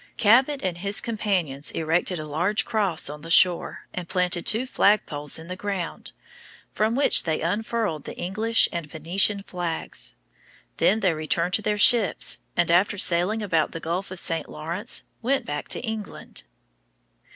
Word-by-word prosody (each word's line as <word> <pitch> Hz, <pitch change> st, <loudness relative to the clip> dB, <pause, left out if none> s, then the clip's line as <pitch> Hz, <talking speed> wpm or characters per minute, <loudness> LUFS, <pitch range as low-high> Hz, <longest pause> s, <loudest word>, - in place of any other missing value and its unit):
Cabot 260 Hz, +6 st, +3 dB
and 180 Hz, -2 st, -2 dB
his 200 Hz, +2 st, 0 dB
companions 185 Hz, -, -1 dB
erected 165 Hz, +2 st, 0 dB
a 155 Hz, -, -6 dB
large 175 Hz, +8 st, 0 dB
cross 205 Hz, -8 st, 0 dB
on 150 Hz, +1 st, -6 dB
the 165 Hz, -, -10 dB
shore, 180 Hz, 0 st, +3 dB
and 175 Hz, -2 st, -6 dB
planted 180 Hz, -2 st, 0 dB
two 225 Hz, +4 st, +2 dB
flagpoles 155 Hz, -, +1 dB
in 160 Hz, +1 st, -10 dB
the 180 Hz, -, -5 dB
ground, 190 Hz, -3 st, -4 dB, 0.6 s
from 220 Hz, +2 st, 0 dB
which 280 Hz, -, +4 dB
they 160 Hz, -2 st, -2 dB
unfurled 205 Hz, -2 st, -2 dB
the -, -, -8 dB
English 215 Hz, +6 st, +2 dB
and 170 Hz, -3 st, -5 dB
Venetian 185 Hz, +6 st, 0 dB
flags. 170 Hz, -, -4 dB, 0.6 s
Then 215 Hz, +3 st, +2 dB
they 185 Hz, -4 st, +2 dB
returned 155 Hz, +3 st, -1 dB
to 215 Hz, -, +2 dB
their 210 Hz, 0 st, -1 dB
ships, 220 Hz, 0 st, +4 dB, 0.2 s
and, 175 Hz, -1 st, +2 dB
after 185 Hz, +4 st, +3 dB
sailing 185 Hz, +5 st, +3 dB
about 165 Hz, -6 st, 0 dB
the 165 Hz, -, -5 dB
Gulf 175 Hz, +4 st, -3 dB
of 185 Hz, -1 st, -5 dB
St. 165 Hz, -1 st, -1 dB
Lawrence, 170 Hz, +7 st, -2 dB, 0.2 s
went 265 Hz, +3 st, 0 dB
back 145 Hz, -, -5 dB
to -, -, 0 dB
England. 220 Hz, -3 st, -6 dB
185 Hz, 160 wpm, -24 LUFS, 165-210 Hz, 0.6 s, which